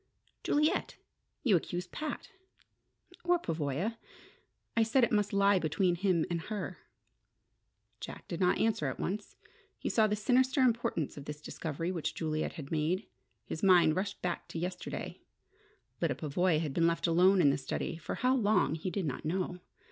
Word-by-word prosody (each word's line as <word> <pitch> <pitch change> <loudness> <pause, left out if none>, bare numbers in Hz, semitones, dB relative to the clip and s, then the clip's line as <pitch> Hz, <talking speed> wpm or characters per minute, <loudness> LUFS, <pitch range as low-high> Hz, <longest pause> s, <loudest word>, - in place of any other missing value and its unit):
"Juliet! 300 +2 +1 0.5
You 225 -9 +4
accuse 175 +1 -2
Pat 300 - -5 0.5
" 360 - -26
"Or 355 0 +4
Pavoya. 165 - -2 0.8
I 230 - +4
said 235 +4 +3
it - - +3
must 210 -2 +2
lie 200 -1 +4
between 175 +3 +1
him 175 -2 +1
and 170 -2 -2
her." 210 +1 -5 1.2
Jack - - -8
did 170 - -4
not 180 -2 +3
answer 220 -10 +1
at 130 - -4
once. 205 +3 -3 0.4
He - - -3
saw 220 -2 +4
the 210 - 0
sinister 255 +5 +2
importance 230 - 0
of 140 - -8
this 150 0 -6
discovery 160 +2 -4
which 170 -4 -3
Juliet 155 -1 -2
had 150 -5 -8
made. 165 +6 0 0.4
His 160 - -5
mind 180 -5 +6
rushed 200 +2 -3
back 175 -1 -2
to - - -7
yesterday. 180 +2 -5 0.8
Lyda - - +1
Pavoya 165 +2 +1
had 155 -4 -2
been 165 +2 +3
left 170 0 0
alone 180 +3 +5
in 145 -5 +6
the - - 0
study, 135 - -3
for 165 - -5
how 255 +1 +2
long 215 -8 +3
he 160 +3 -3
did 190 -1 -2
not 135 -4 -3
know. 180 +2 -2
180 Hz, 170 wpm, -32 LUFS, 160-210 Hz, 1.2 s, mind